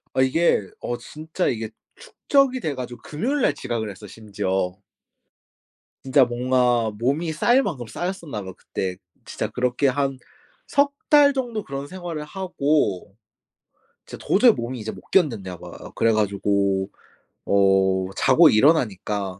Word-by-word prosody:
아 130 Hz, -, +3 dB
이게 130 Hz, -, +2 dB
어 120 Hz, -, -3 dB
진짜 155 Hz, +7 st, -4 dB
이게 110 Hz, -2 st, -2 dB, 0.3 s
축적이 275 Hz, -, +1 dB
돼 155 Hz, -, -3 dB
가지고 125 Hz, -1 st, -7 dB
금요일 250 Hz, -, -2 dB
날 150 Hz, -, +3 dB
지각을 110 Hz, -6 st, -3 dB
했어 100 Hz, +2 st, -10 dB
심지어. 95 Hz, -3 st, -3 dB, 1.3 s
진짜 135 Hz, 0 st, +4 dB
뭔가 120 Hz, -2 st, +1 dB
몸이 150 Hz, +7 st, 0 dB
쌓일 240 Hz, -, +3 dB
만큼 125 Hz, -, -4 dB
쌓였었나 170 Hz, -, -5 dB
봐 95 Hz, -1 st, -8 dB
그때. 95 Hz, -1 st, -4 dB, 0.3 s
진짜 -, -, -4 dB
그렇게 125 Hz, +3 st, 0 dB
한 135 Hz, 0 st, 0 dB, 0.5 s
3 280 Hz, 0 st, +2 dB, 0.2 s
달 290 Hz, -1 st, +7 dB
정도 240 Hz, -6 st, -3 dB
그런 135 Hz, 0 st, -6 dB
생활을 175 Hz, -4 st, -6 dB
하고 150 Hz, -, -1 dB, 0.9 s
진짜 -, -, -11 dB
도저히 235 Hz, +4 st, +6 dB
몸이 120 Hz, -, -5 dB
이제 110 Hz, +1 st, -5 dB
못 -, -, -11 dB
견뎠나 105 Hz, -, 0 dB
봐요. -, -, -11 dB
그래 115 Hz, -, +3 dB
가지고 100 Hz, -2 st, 0 dB, 0.6 s
어 95 Hz, -1 st, +3 dB
자고 165 Hz, -2 st, +6 dB
일어나니까 105 Hz, -, +1 dB
125 Hz, 270 characters per minute, -23 LUFS, 105-165 Hz, 1.3 s, 달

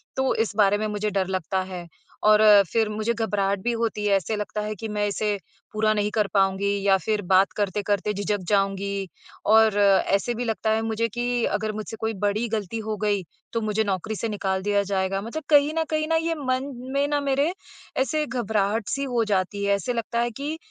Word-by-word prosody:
तो 265 Hz, 0 st, +1 dB
इस 220 Hz, -2 st, -1 dB
बारे 205 Hz, -1 st, +4 dB
में 215 Hz, -, -2 dB
मुझे 210 Hz, 0 st, -2 dB
डर 190 Hz, -2 st, 0 dB
लगता 190 Hz, 0 st, -1 dB
है। 175 Hz, -2 st, -7 dB, 0.4 s
और 215 Hz, 0 st, +6 dB, 0.3 s
फिर 225 Hz, -2 st, +2 dB
मुझे 215 Hz, +2 st, -1 dB
घबराहट 200 Hz, -3 st, 0 dB
भी 240 Hz, -, +1 dB
होती 225 Hz, -2 st, -2 dB
है, 200 Hz, -1 st, +4 dB
ऐसे 205 Hz, +3 st, -3 dB
लगता 210 Hz, 0 st, -3 dB
है 210 Hz, 0 st, -3 dB
कि 220 Hz, +3 st, -6 dB
मैं 210 Hz, -1 st, -1 dB
इसे 205 Hz, 0 st, -1 dB, 0.4 s
पूरा 215 Hz, 0 st, +2 dB
नहीं 210 Hz, 0 st, 0 dB
कर 210 Hz, -2 st, +2 dB
पाऊँगी 195 Hz, 0 st, +2 dB, 0.2 s
या 195 Hz, -1 st, +5 dB
फिर 210 Hz, +3 st, -1 dB
बात 190 Hz, +1 st, +3 dB
करते-करते 205 Hz, 0 st, 0 dB
झिझक 205 Hz, +1 st, -1 dB
जाऊँगी, 195 Hz, -1 st, 0 dB, 0.4 s
और 220 Hz, -1 st, +5 dB
ऐसे 200 Hz, +2 st, +3 dB
भी 245 Hz, -, -3 dB
लगता 225 Hz, -1 st, -1 dB
है 220 Hz, 0 st, +2 dB
मुझे 225 Hz, +1 st, -1 dB
कि 240 Hz, +2 st, -1 dB
अगर 210 Hz, +1 st, -1 dB
मुझसे 215 Hz, +1 st, -5 dB
कोई 220 Hz, 0 st, -1 dB
बड़ी 210 Hz, +3 st, 0 dB
ग़लती 215 Hz, 0 st, -3 dB
हो 215 Hz, 0 st, -3 dB
गई, 205 Hz, -2 st, 0 dB, 0.3 s
तो 230 Hz, -, 0 dB
मुझे 215 Hz, 0 st, 0 dB
नौकरी 200 Hz, +1 st, -2 dB
से 225 Hz, +2 st, -3 dB
निकाल 190 Hz, -2 st, -1 dB
दिया 205 Hz, 0 st, +2 dB
जाएगा। 195 Hz, 0 st, -1 dB
मतलब 235 Hz, +9 st, -5 dB
कहीं 290 Hz, 0 st, +5 dB
न -, -, +2 dB
कहीं 310 Hz, 0 st, 0 dB
ना, 325 Hz, -, +1 dB
ये 330 Hz, 0 st, 0 dB
मन 265 Hz, -1 st, -2 dB, 0.2 s
में 280 Hz, +1 st, +2 dB
ना 290 Hz, 0 st, +1 dB
मेरे 280 Hz, +3 st, +1 dB, 0.5 s
ऐसे 305 Hz, +3 st, 0 dB
घबराहट-सी 220 Hz, 0 st, -1 dB
हो 245 Hz, -4 st, 0 dB
जाती 195 Hz, +2 st, -1 dB
है, 200 Hz, 0 st, +3 dB
ऐसे 200 Hz, +5 st, -2 dB
लगता 235 Hz, 0 st, -2 dB
है 240 Hz, 0 st, 0 dB
कि 300 Hz, +3 st, -3 dB
215 Hz, 205 wpm, -24 LUFS, 200-230 Hz, 0.5 s, और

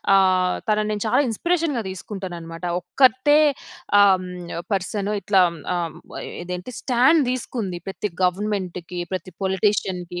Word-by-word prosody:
ఆహ్, 185 Hz, -1 st, +3 dB
తనని 215 Hz, 0 st, +1 dB
నేను 205 Hz, -1 st, -3 dB
చాలా 215 Hz, -, +3 dB
ఇన్స్పిరేషన్‌గా 315 Hz, -, 0 dB
తీసుకుంటాననమాట. 180 Hz, -3 st, -7 dB, 0.2 s
ఒక్కర్తే 260 Hz, +9 st, +4 dB, 0.6 s
ఆహ్, 195 Hz, -2 st, +6 dB
హ్మ్, 180 Hz, -1 st, -7 dB, 0.2 s
పర్సను 200 Hz, +2 st, -1 dB
ఇట్లా 195 Hz, 0 st, +4 dB, 0.3 s
ఆహ్, 170 Hz, -2 st, -2 dB
హ్మ్, -, -, -12 dB, 0.4 s
ఇదేంటి 180 Hz, +4 st, -5 dB
స్టాండ్ 265 Hz, +6 st, +4 dB
దీసుకుంది. 220 Hz, -8 st, -3 dB
ప్రతి 200 Hz, +2 st, -3 dB
గవర్నమెంట్‌కి 180 Hz, -2 st, -2 dB
ప్రతి 185 Hz, 0 st, -5 dB
పొలిటీషియన్‌కి 190 Hz, -2 st, 0 dB
190 Hz, 120 wpm, -23 LUFS, 180-215 Hz, 0.6 s, ఆహ్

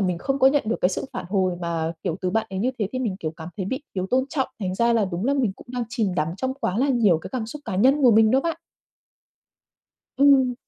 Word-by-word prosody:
mình 180 Hz, -3 st, 0 dB
không 270 Hz, +8 st, -1 dB
có 265 Hz, -, +5 dB
nhận 285 Hz, +1 st, +4 dB
được 225 Hz, -, 0 dB
cái 180 Hz, -, +4 dB
sự 185 Hz, -, -3 dB
phản 245 Hz, -, -5 dB
hồi 190 Hz, -2 st, +1 dB
mà, 165 Hz, -1 st, -2 dB
kiểu, 175 Hz, -3 st, -2 dB
từ 185 Hz, -1 st, -1 dB
bạn 225 Hz, +2 st, 0 dB
ấy 190 Hz, -, -4 dB
như 250 Hz, +6 st, +1 dB
thế 205 Hz, -, -1 dB
thì 255 Hz, -, -2 dB
mình, 215 Hz, -7 st, -2 dB
kiểu, 155 Hz, -, -2 dB
cảm 160 Hz, 0 st, -8 dB
thấy 190 Hz, -2 st, -3 dB
bị 260 Hz, +6 st, -3 dB
thiếu 185 Hz, -1 st, -2 dB
tôn 260 Hz, +1 st, +3 dB
trọng, 265 Hz, -3 st, -1 dB
thành 185 Hz, -1 st, -2 dB
ra 235 Hz, +3 st, +2 dB
là 225 Hz, -3 st, +3 dB
đúng 185 Hz, +2 st, -4 dB
là 280 Hz, +2 st, +2 dB
mình 240 Hz, -8 st, +1 dB
cũng -, -, -15 dB
đang 245 Hz, -2 st, -2 dB
chìm 210 Hz, -6 st, -1 dB
đắm 155 Hz, -1 st, 0 dB
trong 260 Hz, +3 st, -2 dB
quá 210 Hz, -6 st, -2 dB
là 275 Hz, -, +2 dB
nhiều 220 Hz, -, +3 dB
cái -, -, -9 dB
cảm 235 Hz, -4 st, -2 dB
xúc 290 Hz, +5 st, -8 dB
cá 190 Hz, -5 st, -3 dB
nhân 270 Hz, +7 st, +4 dB
của 245 Hz, -, +7 dB
mình 220 Hz, 0 st, +5 dB
đó 265 Hz, +1 st, +4 dB
bạn. 330 Hz, +1 st, -2 dB, 1.6 s
Ừm. 270 Hz, -3 st, +5 dB
225 Hz, 275 wpm, -24 LUFS, 185-260 Hz, 1.6 s, của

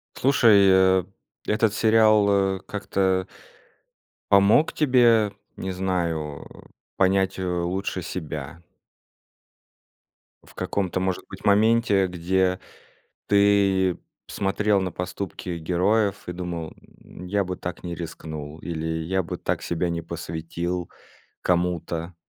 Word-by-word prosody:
Слушай, 115 Hz, -7 st, +5 dB
э, 95 Hz, 0 st, +4 dB, 0.4 s
этот 105 Hz, 0 st, +2 dB
сериал, 105 Hz, -3 st, +3 dB
э, -, -, -12 dB
как-то 95 Hz, -2 st, -1 dB, 1.0 s
помог 100 Hz, +9 st, +5 dB
тебе, 120 Hz, -7 st, +4 dB, 0.2 s
не 95 Hz, -, -4 dB
знаю, 85 Hz, -6 st, -2 dB, 0.5 s
понять, 95 Hz, 0 st, +2 dB
э, -, -, -2 dB
лучше 90 Hz, +2 st, -2 dB
себя? 80 Hz, -1 st, -6 dB, 1.8 s
В -, -, -19 dB
каком-то 95 Hz, -2 st, -2 dB
может 95 Hz, -1 st, -2 dB
быть -, -, -10 dB
моменте, 105 Hz, -1 st, +3 dB
где 90 Hz, +1 st, 0 dB, 0.7 s
ты 100 Hz, -2 st, +3 dB, 0.3 s
смотрел 100 Hz, +1 st, 0 dB
на 95 Hz, -1 st, -2 dB
поступки 90 Hz, -1 st, -5 dB
героев 95 Hz, +5 st, 0 dB
и -, -, -3 dB
думал, 85 Hz, -3 st, -5 dB, 0.3 s
м: 90 Hz, -, -11 dB
"Я 100 Hz, +2 st, 0 dB
бы 90 Hz, 0 st, -4 dB
так 90 Hz, -1 st, -6 dB
не 85 Hz, -1 st, -5 dB
рискнул". 80 Hz, -2 st, -7 dB
Или: 80 Hz, -1 st, -3 dB
"Я 95 Hz, +2 st, -1 dB
бы 80 Hz, -, -5 dB
так -, -, -2 dB
себя 85 Hz, +1 st, -1 dB
не 85 Hz, 0 st, -2 dB
посвятил 85 Hz, +1 st, -4 dB, 0.5 s
кому-то". 85 Hz, -1 st, -1 dB
95 Hz, 110 wpm, -24 LUFS, 85-100 Hz, 1.8 s, Слушай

